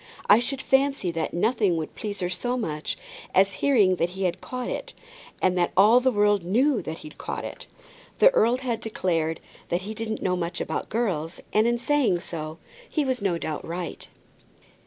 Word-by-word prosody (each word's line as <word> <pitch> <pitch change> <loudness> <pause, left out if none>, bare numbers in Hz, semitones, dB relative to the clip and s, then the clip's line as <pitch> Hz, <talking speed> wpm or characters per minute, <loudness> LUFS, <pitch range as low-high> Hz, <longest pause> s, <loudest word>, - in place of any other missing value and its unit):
I 210 - +7
should 265 +3 -3
fancy 270 -8 +2
that 165 -1 -2
nothing 200 -1 +2
would 155 -1 -4
please 205 -2 -5
her 180 - 0
so 245 +7 -1
much 155 -10 -3 0.4
as 195 +1 +5
hearing 210 -10 +4
that 170 +1 +1
he 195 - -2
had 180 0 -1
caught 255 -1 -5
it, - - -4 0.5
and 185 -1 +3
that 175 - +2
all 215 +6 +7
the 260 +1 +2
world 205 -3 +3
knew 240 +7 +2
that 160 -1 -5
he'd 155 - -12
caught - - -4
it." - - -8 0.5
The - - +7
earl 240 - +3
had 250 -3 -2
declared 165 -8 -1 0.3
that 175 +1 0
he 215 +3 -5
didn't 220 0 -4
know 180 -1 +1
much 175 0 -3
about - - -3
girls, 185 -8 -1
and 215 +2 +4
in 240 0 +2
so 235 - -11
saying, 175 - 0 0.3
he 305 -3 0
was 260 -3 -1
no 190 -4 +1
doubt 155 -2 -4
right. 170 +1 -5
200 Hz, 190 wpm, -25 LUFS, 175-240 Hz, 0.5 s, I